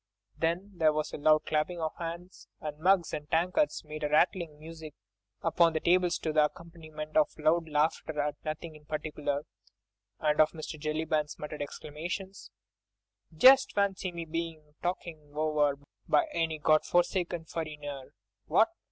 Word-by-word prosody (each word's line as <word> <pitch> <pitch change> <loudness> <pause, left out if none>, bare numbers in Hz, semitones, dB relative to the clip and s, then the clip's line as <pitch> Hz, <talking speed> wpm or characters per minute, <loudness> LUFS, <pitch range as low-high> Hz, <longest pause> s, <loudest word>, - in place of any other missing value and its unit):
Then 170 +5 -1
there 155 -2 +4
was 155 0 -2
loud 155 +1 +3
clapping 155 +3 0
of 160 -1 -2
hands, 170 +2 -7
and 150 -1 -6
mugs 185 0 +3
and 150 0 -5
tankards 180 - +1
made 155 0 -7
a 150 - 0
rattling 160 0 +2
music 160 -1 -10 0.5
upon 165 0 +4
the 160 - +1
tables 180 +1 +3
to 155 - -3
the 150 -1 +5
accompaniment 155 -1 -8
of 155 -1 +5
loud 160 +2 +2
laughter 150 0 0
at 145 0 0
nothing 155 +1 -5
in 150 0 -16
particular, 150 -2 -3 0.8
and 150 0 +3
of 155 - +3
Mr. 155 -1 -7
Jellyband's 155 0 -1
muttered 150 0 -6
exclamations: 175 +7 -6 0.9
"Just 260 +9 +7
fancy 195 -2 0
me 170 -1 -5
bein' 160 -2 -5
talked 175 +1 -2 0.3
over 150 -2 +2 0.3
by 350 - +4
any 165 -1 0
God 155 0 +4
forsaken 175 -1 0
furriner!—What? 150 -4 -2
155 Hz, 145 wpm, -30 LUFS, 150-170 Hz, 0.9 s, Just